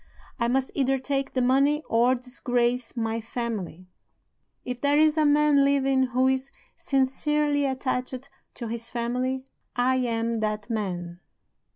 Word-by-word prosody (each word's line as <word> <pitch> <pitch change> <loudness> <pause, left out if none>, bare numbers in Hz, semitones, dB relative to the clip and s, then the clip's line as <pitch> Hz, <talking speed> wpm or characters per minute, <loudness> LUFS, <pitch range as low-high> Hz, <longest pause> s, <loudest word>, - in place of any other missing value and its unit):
I 235 - +1
must 260 +2 0
either 270 -1 +1
take 275 +1 -2
the 255 - +1
money 280 +4 +3
or 240 +3 +3
disgrace 250 -1 -1
my 225 0 -1
family. 215 -7 -5 0.8
If 250 -1 -5
there 285 0 +3
is 310 0 +4
a 310 -2 +3
man 295 -1 +4
living 275 -1 +2
who 255 +1 +2
is 265 +1 0 0.3
sincerely 285 +2 +1
attached 260 0 -3 0.3
to 235 - -6
his 230 +1 -5
family, 250 +2 -2 0.3
I 255 +1 +2
am 230 -2 -1
that 215 +1 -2
man. 175 -5 -3
255 Hz, 140 wpm, -26 LUFS, 235-275 Hz, 0.8 s, is